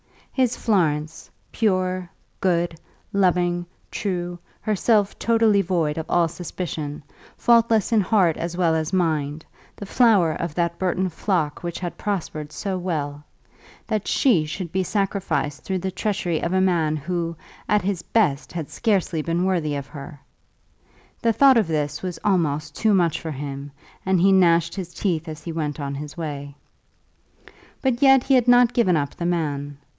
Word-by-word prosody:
His 255 -3 +1
Florence, 160 -7 0 0.2
pure, 185 -4 0 0.3
good, 170 -3 0 0.3
loving, 175 -2 +1 0.2
true, 175 -3 -3 0.2
herself 210 -1 +1
totally 225 -3 +3
void 165 -4 0
of 160 - -5
all 175 -1 +3
suspicion, 155 -4 -5 0.3
faultless 230 -2 +3
in 220 -2 +4
heart 185 -5 +3
as 170 +1 -4
well 170 -3 +3
as 160 0 -1
mind, 155 -4 0 0.3
the 200 - -8
flower 200 -7 +4
of 160 -1 -4
that 170 -1 -1
Burton 185 0 0
flock 165 -4 -1
which 170 -1 -4
had 175 -2 -5
prospered 155 -7 -3
so 190 +3 -3
well, 150 -5 -3 0.6
that 215 -3 -2
she 225 - +3
should 170 +2 -5
be 190 - 0
sacrificed 190 -7 -1
through 190 - -2
the 190 +1 -3
treachery 185 -4 -1
of 170 - -1
a 190 - +3
man 165 -5 +2
who, 170 +2 -3 0.3
at 210 -2 +3
his 190 -2 -1
best, 170 -10 0
had 165 -4 -5
scarcely 190 -7 0
been 170 +3 0
worthy 165 -6 0
of 140 -1 -4
her! 145 0 -10 1.0
The 230 -1 +2
thought 265 +3 +6
of 215 -6 +2
this 150 -2 -2
was 180 -2 -4
almost 155 -7 0
too 215 -2 +3
much 170 -4 +1
for 160 - -4
him, 140 0 -6 0.3
and 190 -1 +2
he 195 +3 +5
gnashed 170 -3 +4
his 180 -3 -6
teeth 170 -4 -1
as 155 -1 -7
he 170 - -5
went 155 -2 -3
on 140 -1 -3
his 145 +2 -7
way. 145 -3 -5 1.3
But 260 -1 0
yet 270 -2 +6
he 275 - +1
had 250 -2 +4
not 245 -1 +6
given 185 -8 +3
up 145 -2 -2
the 170 - -3
man. 145 -5 -2
175 Hz, 160 wpm, -23 LUFS, 155-195 Hz, 1.3 s, thought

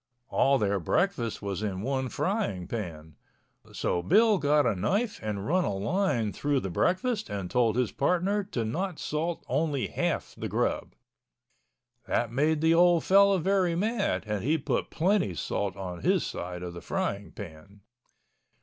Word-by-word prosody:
All 135 0 +3
their 100 -3 +1
breakfast 120 - 0
was 100 -1 -3
in 100 -2 -3
one 130 0 -1
frying 190 - -1
pan. 80 -8 -6 0.5
So 85 - -1
Bill 210 - +4
got 145 0 +3
a - - +2
knife 205 - 0
and 105 -2 -3
run 180 +4 +2
a 100 - -1
line 120 - 0
through 145 -2 0
the 95 - -4
breakfast 215 - 0
and 100 -3 -4
told 115 -3 +2
his 125 -3 +1
partner 180 +7 +1
to 125 - -3
not 175 - -2
salt 160 +3 -3
only 140 0 0
half - - -2
the - - -4
grub. - - -1 1.1
That 120 -2 0
made 150 +5 +1
the 160 0 +4
old 175 0 +5
fellow 200 0 +5
very 185 -1 +1
mad 210 +3 0
and 105 -2 -3
he 155 +6 +2
put 145 - -2
plenty 180 - +1
salt 95 +6 -2
on 90 -3 -6
his - - +2
side 90 0 -5
of 90 -1 -5
the 85 - -8
frying 100 0 -3
pan. 100 +2 -11
135 Hz, 160 wpm, -28 LUFS, -, 1.1 s, old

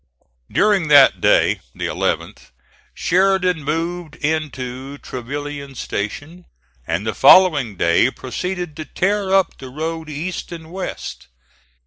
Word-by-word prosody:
During 205 -6 +2
that 145 -2 +6
day, - - +3 0.2
the - - -4
11th, - - -3 0.5
Sheridan 185 -3 +2
moved 165 +2 -3
into 140 -4 -3
Trevilian 140 +2 -6
Station, 145 - -5 0.4
and 85 +5 -2
the 110 - -1
following 145 - +5
day 85 +8 +3
proceeded 175 +6 -5
to 155 - -5
tear 195 +2 -1
up 195 -1 +2
the 130 - -9
road 160 +3 -4
east 165 +6 -5
and 165 -1 -9
west. 120 - -6
155 Hz, 115 wpm, -20 LUFS, 135-180 Hz, 0.5 s, that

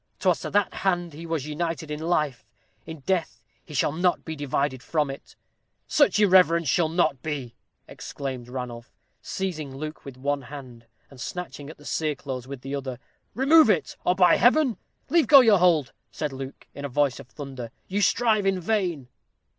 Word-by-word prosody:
'Twas - - +2
to - - -5
that 205 -2 +1
hand 175 -4 0
he 165 +3 -8
was 160 -4 -2
united 160 0 -3
in 150 - -3
life, 150 -7 0 0.4
in 160 -3 -8
death 165 - -2 0.2
he - - -15
shall 145 0 +1
not 175 +3 0
be 160 - -4
divided 140 -2 -1
from 150 -1 0
it." 135 - -11 0.5
"Such 225 -10 +3
irreverence 180 -5 +5
shall 160 +4 +2
not 160 -5 +1
be!" 140 -6 -4 0.3
exclaimed 130 -3 -6
Ranulph, 125 -2 -6 0.3
seizing 155 -8 -4
Luke 155 +2 -6
with 135 -2 -10
one 140 +2 -1
hand, 125 -3 -11 0.2
and 130 -3 -12
snatching 145 -4 -6
at 155 - -11
the 145 - -17
cereclothes 140 -5 -3
with 135 -2 -7
the 135 +1 -6
other. 130 -3 -4 0.4
"Remove 280 +1 +6
it, 160 -10 +1
or 180 - +2
by 180 -1 +5
Heaven 255 -1 +4 0.2
" - - -42
"Leave 335 -1 +4
go 280 -3 +10
your 220 -6 +5
hold," 170 -6 +3 0.2
said 150 -3 -3
Luke, 135 0 -8
in 140 - -8
a 140 - -3
voice 140 0 +1
of - - -11
thunder; 135 -4 -8 0.2
"you 200 +2 -1
strive 210 +1 +3
in 190 -1 +1
vain." 180 - -1
155 Hz, 180 wpm, -25 LUFS, 135-180 Hz, 0.5 s, go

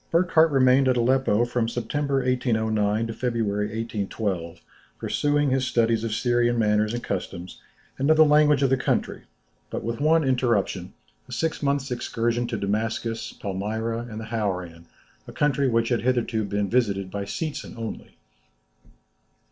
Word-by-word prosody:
] - - -39
Burckhardt 165 -1 +4
remained 130 -1 +4
at 130 -1 +3
Aleppo 120 -2 +2
from 120 -1 -1
September, 135 +3 -1
1809, 110 -4 +1
to 115 - -4
February, 110 -4 -1
1812, 100 -6 -3 0.4
pursuing 145 -1 0
his 130 0 +1
studies 115 -1 +1
of 115 - -2
Syrian 120 +1 +1
manners 105 0 +2
and 120 - -5
customs, 90 -1 -5 0.4
and 140 +3 +1
of 155 - +5
the 155 - +8
language 150 -1 +4
of 135 - +2
the 135 - +4
country, - - -1 0.5
with - - -4 0.2
but - - -6
one 160 +2 +4
interruption, 115 -8 0 0.4
a - - -11
six 165 -1 -2
months' 140 -2 0
excursion 120 0 -1
to 120 -2 -3
Damascus, 110 +3 -2
Palmyra, 110 +4 -3
and 110 -1 -6
the 110 - -6
Hauran, 90 -7 -3 0.4
a - - -8
country 140 -2 +1
which 115 -1 +1
had 120 -2 +1
hitherto 120 -3 0
been 100 0 -1
visited 100 -5 0
by 100 -1 -4
Seetzen 155 +8 -5
only. 115 -1 -7
115 Hz, 155 wpm, -25 LUFS, 105-130 Hz, 0.5 s, the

